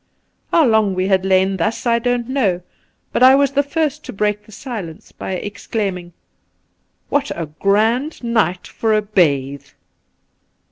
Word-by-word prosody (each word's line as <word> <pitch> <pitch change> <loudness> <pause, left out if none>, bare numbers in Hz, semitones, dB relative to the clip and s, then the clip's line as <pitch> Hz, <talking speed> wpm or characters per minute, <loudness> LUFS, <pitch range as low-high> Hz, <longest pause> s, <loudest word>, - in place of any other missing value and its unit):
How 330 -3 +5
long 220 -5 +2
we 185 +1 0
had 190 -1 +2
lain 190 0 +2
thus 190 +9 -2
I 235 -1 +3
don't 245 0 -1
know, 205 -10 0 0.5
but - - 0
I 260 +1 +8
was 280 -1 +3
the 285 0 +2
first 300 +1 -2
to - - -6
break 210 0 -2
the - - -15
silence 205 - -8
by - - -6
exclaiming: 190 -2 -4 0.5
' - - -47
What 285 0 +1
a 170 - -3
grand 220 - 0
night 220 -6 0
for 220 -1 0
a 215 - +1
bathe 140 -9 0
210 Hz, 155 wpm, -19 LUFS, 185-245 Hz, 0.5 s, I